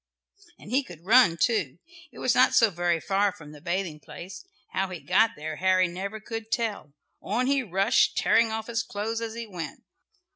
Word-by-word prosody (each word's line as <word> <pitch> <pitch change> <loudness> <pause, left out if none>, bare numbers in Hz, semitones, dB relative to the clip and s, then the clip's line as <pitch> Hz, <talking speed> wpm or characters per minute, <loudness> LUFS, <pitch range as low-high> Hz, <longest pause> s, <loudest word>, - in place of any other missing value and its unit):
And 205 - -12
he 265 +3 +3
could 175 - -13
run 200 -6 +5
too. 185 - 0 0.3
It 240 - -16
was 250 - +1
not 255 - +4
so 225 -3 +5
very 175 -1 0
far 200 +3 +1
from 150 -5 -13
the 150 -1 -13
bathing 175 -2 -3
place. 180 - -10 0.3
How 190 +1 0
he 180 -2 -6
got 205 +7 +2
there 155 +1 -6
Harry 185 0 +3
never 195 +5 -5
could 225 0 -7
tell. 215 -11 -2 0.3
On 235 +6 -1
he 275 +1 +2
rushed, 195 -4 +2
tearing 225 0 +3
off 220 0 -3
his 230 -1 -1
clothes 225 +2 -4
as 225 -1 -5
he 235 0 -5
went. 170 -9 -7
200 Hz, 190 wpm, -26 LUFS, 175-225 Hz, 0.3 s, run